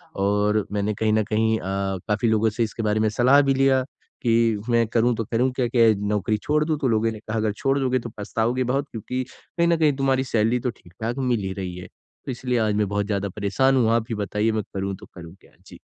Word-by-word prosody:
और 105 +1 +1
मैंने 105 +1 -1
कहीं 110 +1 0
ना 110 0 +3
कहीं 110 +1 +1
अ, - - -10 0.4
काफ़ी 105 +2 +1
लोगों 110 0 +3
से 115 +3 -1
इसके 115 +1 -4
बारे 105 0 +1
में 110 - +2
सलाह 125 +6 +5
भी 140 -1 +2
लिया 135 -1 +3 0.4
कि, 115 -3 +2
"मैं 115 -1 +3
करूँ 120 +1 +2
तो 115 - -3
करूँ 125 +4 +1
क्या? 125 -1 0
क्या 115 -1 +4 0.2
नौकरी 105 +1 0
छोड़ 150 +1 +2
दूँ?" 155 -1 0
तो 135 - 0
लोगों 115 0 +1
ने 110 - -8
कहा, 110 +1 -4
"अगर 110 -1 0
छोड़ 135 +6 0
दोगे, 130 -1 +1
तो 120 - -7
पछताओगे 115 +4 -1
बहुत 135 +3 -1
क्योंकि 125 +3 -4
कहीं 170 +4 -3
ना 170 - +3
कहीं 155 -3 +3
तुम्हारी 135 -1 +1
सैलरी 115 +2 +2
तो 125 - -2
ठीक-ठाक 110 +4 -6
मिल 120 - +2
ही 95 -1 -3
रही 95 -2 -5
है।" 90 - -8 0.4
तो - - -3
इसलिए 125 0 -2
आज 110 -2 +1
मैं 105 -1 +1
बहुत 100 0 -1
ज़्यादा 100 -1 -1
परेशान 105 +8 +1
हूँ। 115 -3 +3
आप 115 -1 +1
ही 115 - -2
बताइए, 105 +2 0
मैं 110 -1 -1
करूँ 95 0 -3
तो - - -13
करूँ 85 0 -10
क्या? - - -22 0.2
जी। - - -13
115 Hz, 240 wpm, -23 LUFS, 105-125 Hz, 0.4 s, सलाह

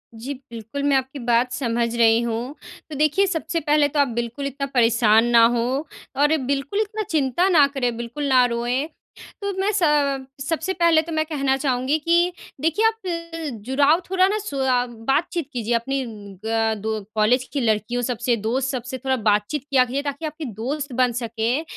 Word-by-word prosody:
जी, 245 +6 -5 0.2
बिल्कुल, 230 +4 -6
मैं 285 -1 +3
आपकी 265 +2 -4
बात 240 0 +1
समझ 235 -2 -1
रही 230 -1 +4
हूँ। 235 +4 -3 0.3
तो 305 - -6
देखिए, 305 +7 +3
सबसे 335 -1 -2
पहले 295 -1 +3
तो 290 +1 -2
आप 285 - +4
बिल्कुल 240 +4 -5
इतना 275 +1 -4
परेशान 230 -2 +4
ना 235 -1 +6
हों, 255 +5 -1 0.4
और 295 +1 +4
ये 315 - +3 0.2
बिल्कुल 280 +8 -2
इतना 430 0 -3
चिंता 310 +3 +1
ना 315 -6 +6
करें, 260 -4 -2
बिल्कुल 240 +5 -4
ना 255 -2 +5
रोएँ। 245 +4 -1 0.5
तो 400 0 -2
मैं 395 +2 +1
स 410 -2 -1
अ, 285 -3 +2 0.2
सबसे 325 +5 -2
पहले 335 -3 +4
तो 330 +1 -8
मैं 310 0 +1
कहना 275 -4 0
चाहूँगी 265 +1 0
कि 340 +3 +2 0.3
देखिए, 330 +8 +1
आप 335 - -2
जुड़ाव 285 +5 +3
थोड़ा 375 0 +4
ना 415 +2 0
सुआ 265 -10 0 0.2
बातचीत 330 +1 0
कीजिए 240 -1 -2
अपनी 270 +4 -1 0.4
ग 225 0 +1
दो 220 +1 -2 0.2
कॉलेज 225 +4 +3
की 285 - 0
लड़कियों 225 +1 0
सबसे, 240 0 0
दोस्त 240 +5 -1
सबसे, 255 0 -4
थोड़ा 265 +1 -1
बातचीत 215 +4 0
किया 260 -2 +4
कीजिए, 260 +3 -2
ताकि 285 +2 -4
आपकी 310 0 -5
दोस्त 265 +6 -4
बन 250 0 +2
सकें 235 +5 -1
270 Hz, 180 wpm, -22 LUFS, 235-305 Hz, 0.5 s, ना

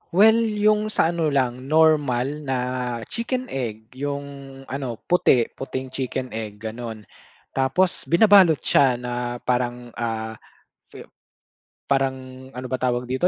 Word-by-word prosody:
Well 220 +5 +6
'yung 215 -1 +2
sa 160 - +3
ano 165 -2 0
lang 130 -1 -1
normal 150 -5 +3 0.2
na 130 -2 -1 0.5
chicken 255 +2 -2
egg, 110 -4 -5
'yung 140 +1 -3 0.4
ano 130 -4 -4
puti 130 -9 +4
puting 130 0 -5
chicken 130 -1 -3
egg 105 -2 -6
gano'n, 110 0 -6 0.5
tapos 160 +8 +1
binabalot 185 -3 +6
siya 130 -3 +3
na 125 0 -5 0.3
parang, 120 -1 -1
ah, 110 -1 -3 0.6
fi - - -10 0.9
parang, 130 -1 -2
ano 130 0 -5
ba 130 - 0
tawag 125 -1 0
dito, 130 +8 +1
130 Hz, 125 wpm, -23 LUFS, 120-160 Hz, 0.9 s, Well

